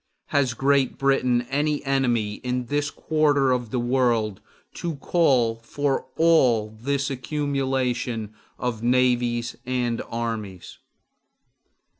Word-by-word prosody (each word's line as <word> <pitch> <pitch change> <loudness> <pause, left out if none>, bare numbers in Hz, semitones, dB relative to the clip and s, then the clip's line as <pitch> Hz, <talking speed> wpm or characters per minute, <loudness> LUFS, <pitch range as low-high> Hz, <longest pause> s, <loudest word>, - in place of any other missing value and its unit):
Has 130 -4 +1
Great 135 +1 +2
Britain 130 -3 +2
any 145 +1 0
enemy 120 -6 +1
in 125 0 -2
this 145 +3 -1
quarter 145 -4 +2
of 125 -2 -1
the 125 - -1
world 120 -4 +1 0.3
to 170 -2 -4
call 135 -7 +2
for 135 +4 -2
all 125 -10 +4
this 140 +5 -1
accumulation 130 -5 -2 0.2
of 120 -3 -3
navies 120 -1 +1
and 125 -2 -1
armies? 110 -6 -5
125 Hz, 105 wpm, -24 LUFS, 120-140 Hz, 0.3 s, all